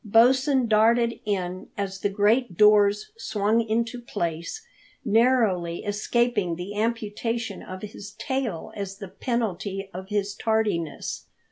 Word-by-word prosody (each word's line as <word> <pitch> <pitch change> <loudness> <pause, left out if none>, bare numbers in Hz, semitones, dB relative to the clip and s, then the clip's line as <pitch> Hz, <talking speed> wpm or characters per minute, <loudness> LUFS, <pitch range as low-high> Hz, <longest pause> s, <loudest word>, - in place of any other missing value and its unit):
Bosin 255 +4 +4
darted 230 +2 +3
in 185 -3 -2
as 195 -1 -3
the 205 - 0
great 210 0 +2
doors 210 - +5
swung 215 - +1
into 230 +2 -1
place, 170 - -4 0.4
narrowly 215 -7 +2
escaping 210 -2 +1
the 180 +4 -6
amputation 230 0 -2
of 185 +1 -8
his 205 -1 -8
tail 235 - -3
as 195 -1 -5
the 200 -1 -7
penalty 195 -3 -3
of 190 +2 -7
his 205 -1 -1
tardiness. 210 -9 -1
210 Hz, 120 wpm, -25 LUFS, 195-235 Hz, 0.4 s, doors